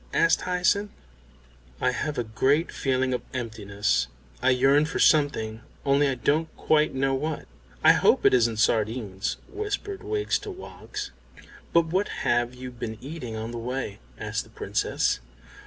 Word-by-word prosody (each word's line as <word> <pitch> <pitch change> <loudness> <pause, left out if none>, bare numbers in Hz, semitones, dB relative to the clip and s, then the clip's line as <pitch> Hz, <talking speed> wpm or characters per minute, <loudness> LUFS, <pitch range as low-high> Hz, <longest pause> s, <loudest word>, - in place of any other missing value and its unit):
asked 165 -1 +4
Hyacinth. 180 +3 +1 0.9
"I 125 - +2
have 150 +3 -3
a 120 - +1
great 135 +9 +1
feeling 130 -2 0
of 125 - -1
emptiness. 105 - -1 0.3
I 130 - +4
yearn 135 +3 +4
for 160 - -3
something, 115 -8 +3 0.2
only 140 +1 +4
I 135 - 0
don't 150 +7 +1
quite 155 -2 +2
know 135 0 +1
what." 150 +3 -2 0.4
"I - - +9
hope - - +3
it - - +6
isn't 115 -3 +3
sardines," 110 -2 0
whispered 410 0 -4
Wiggs 420 -1 0
to 425 - -8
Woggs. 380 -1 -7 0.6
"But 170 -1 +4
what 185 +5 0 0.2
have 120 +1 +2
you 125 0 -7
been 115 -2 -6
eating 135 -5 -6
on 110 +1 -4
the 120 - -5
way?" 125 -3 -4 0.2
asked - - -3
the - - -18
Princess. - - 0
130 Hz, 155 wpm, -26 LUFS, 115-160 Hz, 0.9 s, I